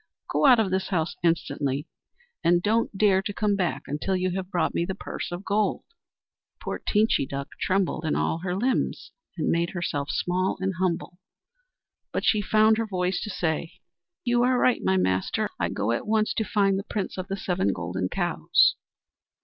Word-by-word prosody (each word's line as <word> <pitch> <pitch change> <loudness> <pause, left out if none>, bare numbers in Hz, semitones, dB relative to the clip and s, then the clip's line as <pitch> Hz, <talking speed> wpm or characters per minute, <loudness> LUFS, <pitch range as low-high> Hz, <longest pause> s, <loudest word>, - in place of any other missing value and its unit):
Go - - +3
out 250 -3 +7
of 205 -4 +1
this 190 0 0
house 165 -3 -1
instantly, 150 -4 0 0.6
and 175 +1 +3
don't 220 -1 +1
dare 195 -2 +4
to 205 +1 -4
come 205 0 +1
back 185 -4 -1
until 150 +7 -2
you 185 0 0
have 185 0 -4
brought 175 -4 0
me - - 0
the 190 +2 -3
purse - - -6
of 175 +3 -6
gold!" 205 -1 0 0.8
Poor - - -4
Teenchy 210 -10 +2
Duck 140 +1 -5
trembled 185 -4 0
in 160 - 0
all 160 - 0
her 180 +1 -2
limbs, 245 +6 -1 0.3
and 155 - 0
made 170 +1 +1
herself 145 -5 -2
small 185 +1 0
and 190 0 -1
humble; 180 -1 -1 0.9
but - - -2
she 215 - +3
found 215 +2 +4
her 225 - -1
voice 180 -2 -1
to 210 - -4
say: 165 -3 -2 0.5
"You 240 0 +3
are 250 +1 +3
right, 250 0 +3
my 95 0 +2
master! 95 0 0
I - - 0
go 105 +3 -1
at 120 - -2
once 215 0 +2
to 220 - 0
find 195 -2 +2
the - - -5
Prince 205 -3 -3
of 185 - -4
the 195 0 -3
Seven 180 - 0
Golden 90 +1 -3
Cows." - - +3
185 Hz, 185 wpm, -26 LUFS, 165-205 Hz, 0.9 s, out